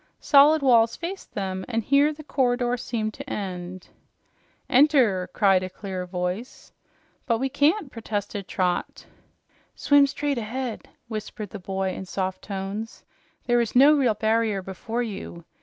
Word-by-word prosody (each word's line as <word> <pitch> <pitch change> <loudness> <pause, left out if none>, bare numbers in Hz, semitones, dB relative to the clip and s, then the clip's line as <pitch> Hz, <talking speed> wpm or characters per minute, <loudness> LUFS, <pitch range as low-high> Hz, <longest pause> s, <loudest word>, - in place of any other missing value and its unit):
Solid 290 +1 +5
walls 230 -3 +4
faced 370 +3 -7
them, 190 -2 -3
and 230 -2 -1
here 280 +5 +4
the 310 0 -10
corridor 245 -3 +1
seemed 230 -3 -3
to - - -9
end. 185 -2 -6 0.8
"Enter!" 250 - +4
said 195 -2 +5
a 185 - -4
clear 185 -1 -6
voice. 180 +6 -5 0.5
"But 230 -2 +2
we 265 +3 -1
can't!" 290 +4 +1
protested 205 -3 -4
Trot. 180 -2 -2 0.7
"Swim 285 -1 +4
straight 280 -1 -2
ahead," 235 +1 -5 0.2
whispered 215 -2 -6
the 205 - -7
boy 190 +1 -2
in 190 - -6
soft 185 0 -3
tones. 200 +3 -6 0.4
"There 240 -1 +3
is 235 - -3
no 280 +4 +7
real 255 -7 +2
barrier 220 -2 0
before 225 +6 -4
you. 190 -6 -7
225 Hz, 140 wpm, -25 LUFS, 190-260 Hz, 0.8 s, no